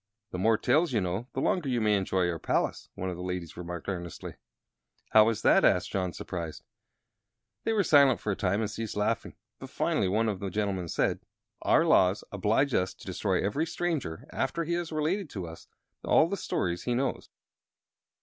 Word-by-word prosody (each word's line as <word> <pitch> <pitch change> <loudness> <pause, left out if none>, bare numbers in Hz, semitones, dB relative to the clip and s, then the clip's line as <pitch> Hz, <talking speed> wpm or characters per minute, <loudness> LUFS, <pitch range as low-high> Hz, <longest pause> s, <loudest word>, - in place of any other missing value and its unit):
"The 90 - -4
more 110 +3 +3
tales 155 +6 +2
you 110 - +3
know 95 +5 -2
the 130 - -2
longer 160 -3 +1
you 125 -2 +1
may 105 -2 +3
enjoy 95 -2 +1
our 85 -2 -2
palace," - - -1
one 95 0 -3
of 90 - -6
the - - -7
ladies 90 -2 -4
remarked, 85 -1 -6
earnestly. 85 -4 -5 0.8
"How 110 0 +7
is 115 - -3
that?" - - +5
asked 90 +3 +3
John, 95 -3 -1
surprised. 85 -4 -6 1.0
They 225 - +1
were 210 -2 +3
silent 140 -6 +5
for 105 - -2
a - - -1
time, 100 +2 0
and 105 -2 -2
ceased 110 0 -5
laughing. 105 - -1 0.2
But - - -9
finally 95 - 0
one 110 +4 +1
of 100 -4 -2
the 100 - -3
gentlemen 95 -2 -2
said: - - 0 0.4
"Our - - +4
laws 95 +2 +4
oblige 110 +7 +1
us 90 +1 0
to - - -15
destroy - - -1
every 145 +11 0
stranger, 160 - -3
after 170 - -1
he 170 +2 -2
has 170 -1 -2
related 160 +4 -1
to 95 -7 -5
us 80 0 -11 0.4
all 160 - +4
the 200 - -2
stories 90 - -2
he 120 - 0
knows. 135 +1 -2
105 Hz, 195 wpm, -29 LUFS, 90-135 Hz, 1.0 s, How